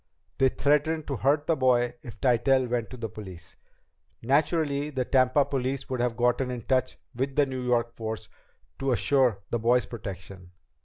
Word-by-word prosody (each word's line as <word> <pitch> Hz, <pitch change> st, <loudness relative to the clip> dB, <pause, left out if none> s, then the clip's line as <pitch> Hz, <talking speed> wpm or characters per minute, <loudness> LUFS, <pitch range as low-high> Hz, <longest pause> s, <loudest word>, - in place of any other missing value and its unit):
They 135 Hz, -, +5 dB
threatened 150 Hz, +3 st, +1 dB
to 140 Hz, -, -3 dB
hurt 145 Hz, +5 st, +2 dB
the 165 Hz, -, +2 dB
boy 125 Hz, -3 st, +2 dB
if 115 Hz, -2 st, -11 dB
Tytell 130 Hz, +1 st, +3 dB
went 120 Hz, -2 st, -2 dB
to 125 Hz, -, -9 dB
the 115 Hz, -1 st, -4 dB
police. 95 Hz, -5 st, -10 dB, 0.7 s
Naturally, 145 Hz, +2 st, +1 dB
the 130 Hz, -4 st, -2 dB
Tampa 130 Hz, +2 st, +3 dB
police 135 Hz, 0 st, -3 dB
would 130 Hz, -, -2 dB
have 120 Hz, -2 st, 0 dB
gotten 125 Hz, +2 st, +1 dB
in 125 Hz, -1 st, -4 dB
touch 130 Hz, 0 st, 0 dB, 0.2 s
with 135 Hz, +2 st, -3 dB
the 145 Hz, -, +4 dB
New 130 Hz, -1 st, -5 dB
York 120 Hz, -1 st, 0 dB
force 110 Hz, -1 st, -5 dB, 0.5 s
to 135 Hz, -1 st, +1 dB
assure 125 Hz, -5 st, +2 dB
the 120 Hz, -, 0 dB
boy's 120 Hz, +2 st, +3 dB
protection. 95 Hz, -4 st, -9 dB
125 Hz, 170 wpm, -27 LUFS, 115-135 Hz, 0.7 s, They